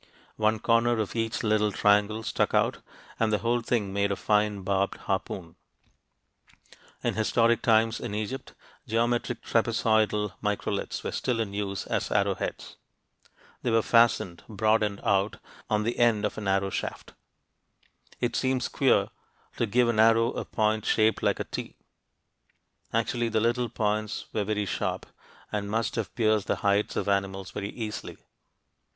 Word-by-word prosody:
One 110 0 +2
corner 115 +2 +2
of 110 0 -2
each 115 0 -1
little 105 -1 +2
triangle 105 +2 +2
stuck - - 0
out, - - +2 0.4
and 115 -1 +2
the 105 - +3
whole 120 +2 0
thing 110 -4 -1
made 100 0 +1
a - - +1
fine 105 -1 +1
barbed 100 +1 0
harpoon. 95 -3 -4 1.5
In - - +1
historic 115 +1 +2
times 115 0 +3
in 110 -4 -4
Egypt, 110 +5 -5 0.3
geometric 120 +1 0
trapezoidal 110 -3 +1
microliths 105 -1 -2
were - - -3
still 125 -3 -1
in 105 -3 -2
use 100 -1 -3
as - - -2
arrowheads. - - -1 0.8
They 125 - -1
were 115 -1 +3
fastened 115 -7 +3
broad 110 +1 +2
end 105 -2 -2
out 100 +1 +1 0.3
on 105 0 +1
the 115 +2 -2
end 115 -3 +3
of 105 - -2
an 105 -2 -5
arrow 95 0 +1
shaft. - - -5 1.1
It 120 -1 -1
seems 130 -1 0
queer - - +2 0.5
to - - +1
give 120 +3 +3
an 115 -2 +1
arrow 115 +1 +5
a - - -4
point 110 -1 0
shaped 110 0 +2
like - - +1
a - - 0
"T." - - -6 1.2
Actually, 115 +1 0
the 110 0 +1
little 120 +2 +1
points 110 -1 -2
were 105 - 0
very 105 0 -1
sharp, - - -2 0.5
and 100 -1 -2
must 115 +2 -1
have 115 -3 -4
pierced 110 -4 +2
the - - +1
hides 100 +1 +2
of - - -1
animals 95 -1 -1
very 100 -1 -4
easily. 110 -2 -6
110 Hz, 155 wpm, -27 LUFS, 105-115 Hz, 1.5 s, arrow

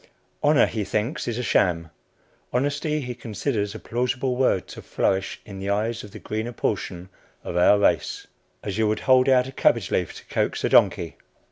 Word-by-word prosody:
Honor 145 -3 +5
he 110 -2 -3
thinks 110 +10 -2
is 120 -1 -2
a 125 - -2
sham. 85 -7 +1 0.6
Honesty 145 +4 0
he 125 -2 -4
considers 110 -2 -3
a - - -6
plausible 125 +2 -1
word 125 -8 +2
to - - -9
flourish 95 0 -1
in 100 -2 -9
the 100 +1 -4
eyes 110 +3 -1
of 105 - -10
the - - -10
greener 110 +3 -4
portion 90 -5 -3 0.3
of - - -5
our 90 +4 +5
race, 100 - +1 0.4
as 100 0 -3
you 110 - +3
would 110 0 -1
hold 130 0 +4
out 125 -1 +5
a - - -7
cabbage 115 -6 +2
leaf 90 - -1
to - - -12
coax - - -1
a - - +2
donkey. - - +3
110 Hz, 190 wpm, -24 LUFS, 100-125 Hz, 0.6 s, Honor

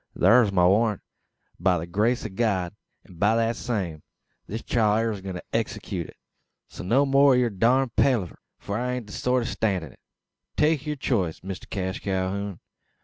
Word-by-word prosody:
"Thur's 115 -3 +5
my 90 -2 +3
warrant, 105 +2 +2 0.6
by 90 0 +3
the 80 - -4
grace 110 +8 0
o' - - -3
God; 95 -3 -1 0.3
an 90 - -16
by 105 +4 +3
thet 115 0 +1
same, 95 -12 -3 0.5
this 110 +3 -5
chile 110 -2 +2
air 115 0 0
a 100 -3 -6
goin' 95 -1 -6
to 90 - -7
execute - - -2
it. - - -15 0.5
So - - -9
no 125 +10 +3
more 140 0 +5
o' - - +3
yur 120 -2 +2
durned 120 +5 +2
palaver: 115 - +1 0.2
for 100 +2 -4
I 125 +1 -1
ain't 125 -2 -4
the 105 - -11
sort 125 -1 0
to - - -3
stan' 100 -6 0
it. 75 - -12 0.6
Take 150 -1 +2
yur 150 - -1
choice, 100 - -1
Mister 95 -1 -7
Cash 95 -2 -3
Calhoun. 95 0 -2
105 Hz, 190 wpm, -25 LUFS, 95-120 Hz, 0.6 s, Thur's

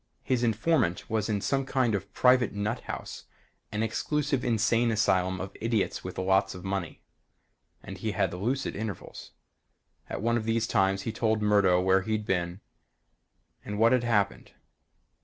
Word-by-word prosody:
His 130 -2 0
informant 115 - +1
was 110 -1 0
in 105 -2 0
some 135 +5 0
kind 130 -4 +1
of 100 - -1
a - - -34
private 125 -1 +3
nut 105 +4 -2
house - - -7 0.5
an 105 +1 -1
exclusive 145 +4 -1
insane 115 0 +2
asylum 95 -4 +1
of 95 +1 -6
idiots 115 -3 -1
with 90 - -7
lots 95 +1 +2
of 90 - -9
money 95 -4 -4 0.8
and 95 0 -8
he 110 +1 -2
had 95 -5 0
lucid 120 +9 -2
intervals. 105 -3 -7 0.8
At - - -4
one 115 +1 +2
of 110 - -3
these 115 0 +1
times 95 -2 +1
he 115 - -2
told 110 -1 0
Murdo 100 -4 +4
where 95 +1 +3
he'd 110 +1 -2
been 90 0 -1 1.0
and 105 0 -5
what 115 +2 +5
had 125 -2 +3
happened. 115 -4 0
105 Hz, 160 wpm, -28 LUFS, 95-115 Hz, 1.0 s, what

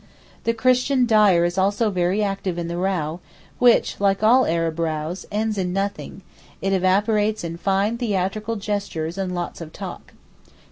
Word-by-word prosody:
The 230 - +2
Christian 255 +2 +2
dyer 210 -7 +4
is 175 +2 -1
also 205 +3 +1
very 185 +3 +1
active 195 -3 -2
in 170 -1 -3
the 170 0 -4
row, 175 -3 -1 0.4
which, 245 -1 +3
like 195 +1 +1
all 250 +4 +5
Arab 165 0 -1
rows, 160 +2 -3
ends 215 0 -1
in 180 -1 -1
nothing; 195 0 -4 0.4
it 195 0 -1
evaporates 205 +3 +1
in 165 -1 -4
fine 195 +6 0
theatrical 215 0 -1
gestures 200 -5 -3
and 185 -2 -2
lots 175 0 -5
of 160 -1 -8
talk. - - -9
195 Hz, 155 wpm, -22 LUFS, 175-215 Hz, 0.4 s, all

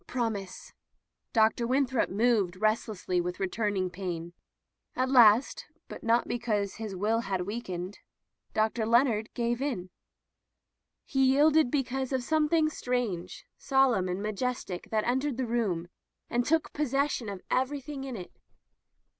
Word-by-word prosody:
"Promise." 220 -6 -4 0.6
Dr. 225 +1 +3
Winthrop 260 -1 +1
moved 205 -3 +2
rest 215 +3 +1
lessly 185 -4 -1
with 180 +1 -4
returning 195 -1 -1
pain. 175 -2 -5 0.6
At 255 +1 0
last, 240 -1 +5 0.2
but - - -9
not 230 +1 +2
because 210 -4 -1
his 215 -3 -5
will 215 +5 +1
had 195 -5 -2
weak 215 +6 -4
ened. 180 +2 -5 0.6
Dr. 220 +1 +1
Leonard 230 -2 +3
gave 240 +1 -1
in. 215 -11 -3 1.1
He 270 -2 +1
yielded 290 +2 +5
be 275 0 +1
cause 260 +1 -3
of 260 -2 0
something 310 +2 +2
strange, 245 - -3
solemn, 265 -9 +2
and 185 +3 -3
majestic 215 -3 -3
that 215 -1 +1
entered 260 +1 0
the 260 - -1
room 210 -8 -1 0.4
and 240 +1 +2
took 320 +4 +1
possession 280 -5 0
of 195 -2 -7
everything 275 +1 -1
in 265 -2 -5
it. 180 -4 -8
235 Hz, 140 wpm, -29 LUFS, 200-260 Hz, 1.1 s, last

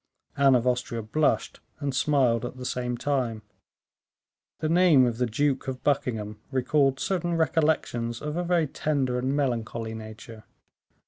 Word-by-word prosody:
Anne 135 -1 +5
of 120 -1 +1
Austria 125 -2 -1
blushed 150 +8 0 0.2
and 140 -2 -2
smiled 130 -4 +2
at 120 +1 -6
the 125 - -7
same 125 -1 -2
time. 125 -6 -1 1.1
The 155 - -2
name 165 -5 +5
of 120 -1 -2
the 125 - +2
Duke 135 +5 0
of 130 -1 -5
Buckingham 110 -7 -1
recalled 135 +1 +1
certain 175 -1 -1
recollections 150 -8 0
of 150 0 -4
a 175 - -1
very 175 -2 +2
tender 135 -3 -1
and 130 +2 -1
melancholy 115 -4 -2
nature. 110 0 -10
130 Hz, 145 wpm, -26 LUFS, 115-150 Hz, 1.1 s, Anne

